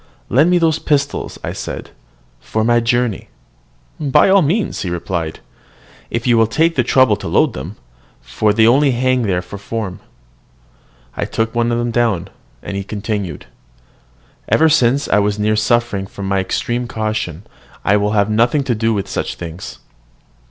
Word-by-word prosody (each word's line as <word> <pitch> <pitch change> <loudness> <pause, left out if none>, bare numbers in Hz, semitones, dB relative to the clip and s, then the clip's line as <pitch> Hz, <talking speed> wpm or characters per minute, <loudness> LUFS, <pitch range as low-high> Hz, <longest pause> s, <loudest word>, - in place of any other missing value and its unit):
"Lend 150 +7 +4
me 180 - +4
those 160 -2 +2
pistols," 145 -2 -1 0.2
said - - -6
I, - - -22 0.5
"for 110 - -2
my 120 +1 +3
journey." 120 -2 0 0.7
"By 150 +3 +4
all 195 0 +6
means," 180 +8 0
he 90 - -3
replied, 85 -2 -3 0.7
"if 115 0 -3
you 120 -2 +4
will 115 - +4
take 165 +9 +1
the 130 - +2
trouble 130 -3 +4
to - - -7
load - - +2
them; 80 +11 -7 0.4
for 65 - 0
they 110 +2 +4
only 135 +5 +4
hang 130 +1 +1
there 95 -5 0
for 95 +3 -9
form." 105 -2 -5 1.2
I - - -2
took 115 0 -1
down 120 0 +1
one - - 0
of 120 0 -1
them; 110 -7 +1 0.4
and 100 - -5
he 100 - -3
continued, 100 -2 -4 1.0
"Ever 160 0 +4
since 140 -2 +3
I 105 - +3
was 105 0 0
near 105 +1 +1
suffering 110 -3 0
for 100 - -9
my 95 0 0
extreme 120 +5 -2
caution, 110 -6 -3 0.4
I 105 - +4
will 105 +1 0
have 100 -1 +3
nothing 120 +7 +2
to 130 -3 0
do 115 0 0
with 100 -1 -2
such - - -3
things." 80 -8 -8
115 Hz, 170 wpm, -17 LUFS, 100-125 Hz, 1.2 s, all